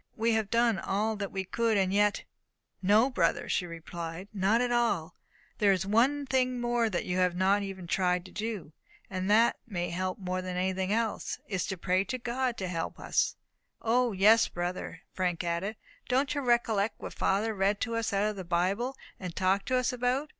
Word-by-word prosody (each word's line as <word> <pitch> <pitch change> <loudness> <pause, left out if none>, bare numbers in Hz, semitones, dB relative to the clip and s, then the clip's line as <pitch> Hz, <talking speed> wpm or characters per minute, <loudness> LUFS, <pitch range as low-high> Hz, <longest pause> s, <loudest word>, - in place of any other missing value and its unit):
We 230 +1 +1
have 220 -2 0
done 230 -3 +2
all 215 +5 0
that 200 -2 -4
we 190 - -2
could, 225 +3 +1
and 190 -1 +1
yet 205 0 +2 0.3
." - - -51
"No, 215 +7 +4
brother," 175 -9 +1
she 180 - 0
replied, 170 +2 -7
"not 200 +3 +2
at 245 0 0
all. 205 -9 +1 0.5
There 205 -2 +5
is 190 -1 +1
one 255 +8 +2
thing 255 -1 +1
more 240 -1 +1
that 180 - -2
you 180 - -1
have 180 -1 +2
not 195 +3 +3
even 195 -2 -6
tried 180 0 +1
to 185 - -12
do; 210 -8 -4 0.4
and 185 0 -2
that 225 +3 +5
may 175 -6 -3
help 185 +1 -2
us 190 - -11
more 185 0 -1
than 185 -1 -4
anything 190 +1 0
else. 225 0 -1
It - - -9
is 185 - 0
to 190 - -3
pray 185 +2 +1
to 255 - -3
God 245 0 -2
to 190 - -3
help 165 -2 -4
us." - - +1 0.4
"O, 240 +1 +2
yes, 215 +4 +5
brother," 175 -1 -4
Frank 180 -2 -1
added, 175 +5 -2 0.3
"don't 265 +3 +2
you 290 - -1
recollect 230 -4 +1
what - - -7
father 215 +3 +1
read 200 +1 +1
to 230 -1 -1
us 230 -1 -1
out 200 +1 +2
of 215 - -2
the 190 - -5
Bible, 190 +10 0 0.2
and 180 -3 -6
talked 190 +1 +1
to 255 - +1
us 255 0 +1
about? 250 +4 0
200 Hz, 205 wpm, -29 LUFS, 185-230 Hz, 0.5 s, There